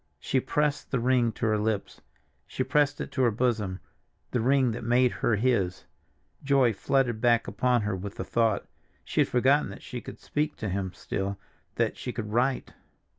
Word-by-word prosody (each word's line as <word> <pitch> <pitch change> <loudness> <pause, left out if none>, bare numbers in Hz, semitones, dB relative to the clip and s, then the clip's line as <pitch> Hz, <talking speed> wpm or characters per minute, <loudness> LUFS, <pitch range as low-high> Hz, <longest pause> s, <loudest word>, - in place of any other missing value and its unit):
She 130 - 0
pressed 150 +2 -1
the 130 - 0
ring 120 -1 +2
to - - -3
her 110 -1 +2
lips, 105 -1 -2 0.5
she 130 - -2
pressed 145 +2 +2
it - - -5
to 130 - -1
her 125 - +5
bosom—the 115 0 -3
ring 130 0 +3
that 115 - -5
made 120 +2 +3
her 115 - +1
his—joy 120 +4 -1
flooded 120 +1 0
back 120 -1 +3
upon 125 -3 +1
her 105 -1 -1
with 100 +2 -6
the - - -4
thought. 115 -3 +1 0.4
She - - +1
had - - +3
forgotten 135 +4 +3
that - - -10
she 125 -2 -6
could - - -9
speak 150 +1 -2
to 105 - -4
him 95 0 -2
still, 100 +1 -4 0.4
that - - 0
she 125 - -4
could 110 -3 -5
write. 125 +3 0
120 Hz, 180 wpm, -27 LUFS, 105-130 Hz, 0.5 s, her